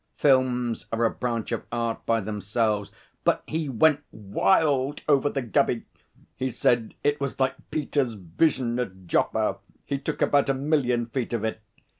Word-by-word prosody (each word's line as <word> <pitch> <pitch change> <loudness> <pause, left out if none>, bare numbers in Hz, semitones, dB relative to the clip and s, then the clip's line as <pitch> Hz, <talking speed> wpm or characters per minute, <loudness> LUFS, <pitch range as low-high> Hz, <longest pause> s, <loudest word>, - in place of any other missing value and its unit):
Films 125 -4 +2
are 115 +1 +1
a - - +2
branch 120 -3 -3
of 115 - -2
art 115 -1 -2
by 115 0 +3
themselves. 105 0 -1 0.3
But - - +2
he 155 -2 -2
went 145 +4 +4
wild 140 - +1
over 145 -1 +4
the 135 -2 -2
Gubby. 120 -1 +1 0.5
He 130 - -2
said 120 -1 +1
it 145 0 +1
was 140 -1 -3
like 130 0 +2 0.2
Peter's 140 -5 0
vision 120 - 0
at 95 -6 -5
Joppa. - - +1 0.3
He 140 -1 -2
took 150 +2 -2
about 140 -1 +3
a 135 - +2
million 130 -4 +1
feet 120 +1 -3
of 115 -2 -1
it. 110 0 -2
125 Hz, 160 wpm, -26 LUFS, 115-140 Hz, 0.5 s, went